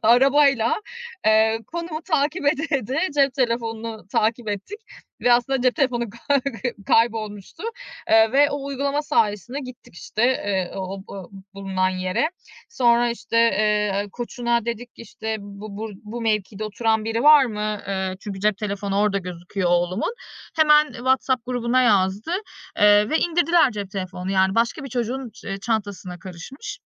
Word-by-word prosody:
arabayla, 260 +1 +4 0.5
eee, 220 +1 +4
konumu 335 -1 -5
takip 305 -1 0
ede 300 +2 +2
ede 260 +2 -3 0.2
cep 275 -2 +3
telefonunu 230 -4 -2
takip 225 +1 +1
ettik 205 - -5 0.4
ve 245 - +4
aslında 250 +2 +2
cep 255 -1 +3
telefonu 255 -4 +1 0.2
kay 285 -1 +4 0.5
kaybolmuştu, 215 - 0 0.5
eee, 220 0 +5
ve 285 +2 +5
o 285 -1 -4
uygulama 280 +1 -1
sayesinde 250 - 0
gittik 255 -8 -11
işte, 215 +5 -4
eee, 200 -7 0
o 190 0 -5
o 195 -3 -9 0.2
bulunan 190 -1 -1
yere. 185 - -1 0.4
Sonra, 240 - +3
işte, 235 0 -4
eee, 210 -3 +2
koçuna 235 -1 -1
dedik, 235 +1 -4
işte, 220 0 -5
"bu 200 0 -9
bur 220 +1 -5
bu 225 +3 -6
mevkide 215 -2 -1
oturan 220 +1 0
biri 225 +1 -1
var 300 -1 +8
mı?" 210 -3 -3
Eee, 190 -1 -2
çünkü 200 -2 -7
cep 210 0 +2
telefonu 200 -1 -2
orada 205 -1 +2
gözüküyor 180 0 -3
oğlumun. 175 - 0 0.4
Hemen 300 -1 +5
WhatsApp 260 0 0
grubuna 250 0 +1
yazdı, 205 - +2 0.5
eee, 210 0 +6
ve 315 - +2
indirdiler 340 -3 +3
cep 205 -4 -6
telefonunu 185 -1 -5
yani 190 0 +2
başka 235 +5 0
bir 275 - -6
çocuğun 245 +1 -3
ç - - -17
eee, 195 - -3
çantasına 205 -5 -3
karışmış. 185 - -8
225 Hz, 145 wpm, -23 LUFS, 200-260 Hz, 0.5 s, var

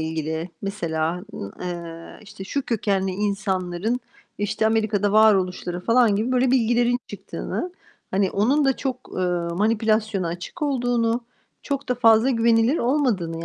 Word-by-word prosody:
ilgili 160 +1 -3
mesela, 170 -3 -2
ııı, 100 - -6
eee, 170 -2 -7
işte, 200 -2 -10
şu 280 +8 -2
kökenli 200 -5 0
insanların, 195 +2 -1 0.4
işte, 205 +1 0
Amerika'da 215 -2 +1
varoluşları 185 -4 +3
falan 230 +1 +3
gibi 225 +5 -1
böyle 255 0 +3
bilgilerin 240 -1 +3
çıktığını, 205 - -5 0.4
hani 190 0 +1
onun 265 +9 +2
da 270 -1 +2
çok, 255 -2 -4
ııı, 175 -2 -1
manipülasyona 215 -2 +1
açık 175 - -7
olduğunu, 245 -4 0 0.4
çok 280 -1 -3
da 250 - +2
fazla 230 +1 +5
güvenilir 230 +3 +3
olmadığını, 215 - 0
210 Hz, 130 wpm, -23 LUFS, 180-240 Hz, 0.4 s, fazla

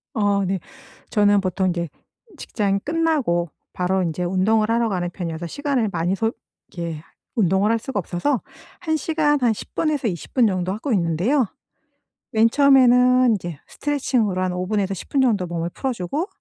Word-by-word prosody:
어 205 -2 +2
네. 190 0 -1 0.5
저는 205 -2 +3
보통 185 0 0
인제 170 -2 -2 0.5
직장이 200 -6 -1
끝나고 285 - 0 0.2
바로 185 +1 0
인제 175 0 -2
운동을 210 +5 +2
하러 230 0 +2
가는 180 -3 -1
편이어서 170 -2 -5
시간을 275 - -1
많이 180 +1 0
소 225 +2 0 0.4
이렇게 170 -3 -5 0.3
운동을 195 -1 +2
할 230 - +1
수가 230 -2 -3
없어서 210 - -1 0.4
1 320 -2 -1
시간 300 -2 +1
한 240 -3 +3
10 - - -10
분에서 300 -6 0
20 175 -6 -5
분 245 -4 +4
정도 185 -1 -1
하고 235 +5 -2
있는데요. 195 - +1 0.8
맨 225 +1 +4
처음에는 255 -2 +5
인제 175 -8 -3
스트레칭으로 250 -10 -1
한 185 -1 0
5 180 0 -2
분에서 200 -2 0
10 190 - -8
분 275 - +2
정도 215 -8 +2
몸을 170 -1 -3
풀어주고 265 - -2
205 Hz, 320 characters per minute, -22 LUFS, 180-255 Hz, 0.8 s, 처음에는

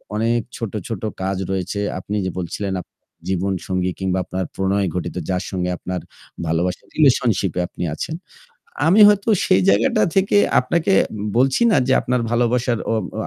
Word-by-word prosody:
অনেক 115 +2 +1 0.2
ছোট, 115 -4 -4 0.2
ছোট 115 -5 -4 0.2
কাজ 95 0 -1
রয়েছে। 95 +1 -2 0.2
আপনি 100 +3 -5
যে - - -1
বলছিলেন 95 +3 -3
আপনার - - -25 0.2
জীবনসঙ্গী 95 -1 -1
কিংবা 95 -1 0
আপনার 95 0 -3
প্রণয় 95 0 0
ঘটিত 90 - -3
যার 90 0 0
সঙ্গে 90 -1 -2
আপনার 90 0 -4 0.5
ভালোবাসার 85 +3 -1
রিলেশনশিপ 120 - +3
এ - - +2
আপনি - - -7
আছেন। 160 - -4 0.7
আমি 195 +6 +6
হয়তো 205 +1 +1 0.2
সেই 95 - +4
জায়গাটা 105 +1 +3
থেকে 195 +1 +3 0.2
আপনাকে 170 +8 +1 0.4
বলছি 130 - +3
না - - +4
যে 130 - +3
আপনার 125 0 0
ভালোবাসার 120 0 +1
ও - - +2 0.2
ও - - -2
100 Hz, 160 wpm, -20 LUFS, 95-125 Hz, 0.7 s, আমি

